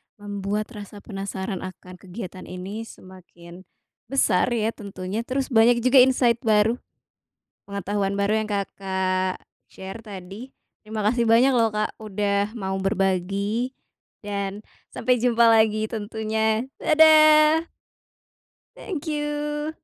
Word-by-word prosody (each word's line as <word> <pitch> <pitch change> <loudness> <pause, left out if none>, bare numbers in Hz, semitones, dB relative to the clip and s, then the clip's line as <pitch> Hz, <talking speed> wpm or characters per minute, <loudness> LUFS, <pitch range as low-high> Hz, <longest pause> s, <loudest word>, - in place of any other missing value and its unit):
membuat 205 +2 -4
rasa 205 -2 -10
penasaran 195 -1 -5
akan 185 -1 -10
kegiatan 185 -1 -9
ini 200 +5 -7
semakin, 180 -1 -14 0.4
besar 250 -8 +2
ya 220 0 0
tentunya, 200 +2 -6
terus 270 +1 -2
banyak 235 +1 +4
juga 255 +1 +6
insight 250 -2 +4
baru, 220 +3 +3 0.9
pengetahuan 200 0 -2
baru 210 +2 +1
yang 215 - -6
Kakak 190 -2 -2 0.3
share 190 +4 -9
tadi. 200 +4 -9 0.3
Terima 215 -1 -4
kasih 235 +1 +2
banyak 250 +4 +5
loh 230 -2 +3
Kak 215 0 -2
udah 205 +1 -1
mau 190 -2 -3
berbagi 195 +4 0 0.6
dan 200 0 -4 0.2
sampai 250 -2 0
jumpa 235 -1 +4
lagi 220 -1 +4
tentunya, 220 +1 -1 0.2
dadah! 310 +1 +6 1.1
Thank 340 -6 -6
you. 295 0 -3
215 Hz, 110 wpm, -24 LUFS, 195-235 Hz, 1.1 s, juga